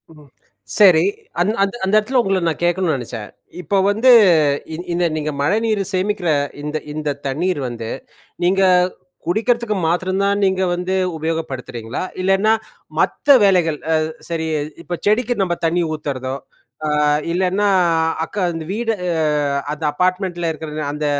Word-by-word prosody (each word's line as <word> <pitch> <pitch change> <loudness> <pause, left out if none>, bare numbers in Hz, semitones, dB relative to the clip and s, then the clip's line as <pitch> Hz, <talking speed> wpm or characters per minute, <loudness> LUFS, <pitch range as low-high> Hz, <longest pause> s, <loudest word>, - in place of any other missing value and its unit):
ம். 150 -2 -17 0.5
சரி. 180 -6 +7 0.4
அந்த 200 +5 +2
அந் 195 - 0
அந்த 190 - -1
இடத்தில 240 +5 +2
உங்கள 195 -4 0
நான் 165 - -2
கேட்கணுன்னு 175 -2 +1
நெனச்சேன். 115 -4 -6 0.3
இப்ப 200 - -2 0.2
வந்து 225 +5 +3 0.6
இ - - -3 0.2
இந்த 175 0 +1
நீங்க 155 -1 -2
மழைநீர 215 +6 +1
சேமிக்கிற 190 -1 0 0.3
இந்த 150 +1 -3 0.2
இந்த 150 -1 -3 0.2
தண்ணீர் 165 +5 -1
வந்து 115 -2 -6 0.5
நீங்க 190 +2 +3 0.6
குடிக்கிறதுக்கு 220 +4 0
மாத்திரம் 185 +3 0
தான், 200 0 +1
நீங்க 190 -1 +2
வந்து 180 +1 -3 0.2
உபயோகப்படுத்துறீங்களா? 135 -8 -4 0.2
இல்லன்னா, 195 +4 +3 0.5
மத்த 285 -1 +4
வேலைகள் 175 -6 +3 0.2
அ - - +4 0.3
சரி 165 -1 -2 0.4
இப்ப 175 0 -4
செடிக்கு 220 +4 +2
நம்ம 175 -2 0
தண்ணி 170 +2 +1
ஊத்தறதோ, 135 -4 -4 0.5
ஆ - - 0 0.4
இல்லன்னா, 190 +3 +1 0.6
அக்க 185 +1 -2
இந்த 165 -1 -5
வீடு 225 +1 -1 0.8
அந்த 155 +1 -8
அப்பார்ட்மெண்ட்ல 180 0 0
இருக்கிற 155 0 -8 0.2
அந்த 150 0 -3
180 Hz, 135 wpm, -19 LUFS, 155-200 Hz, 0.8 s, சரி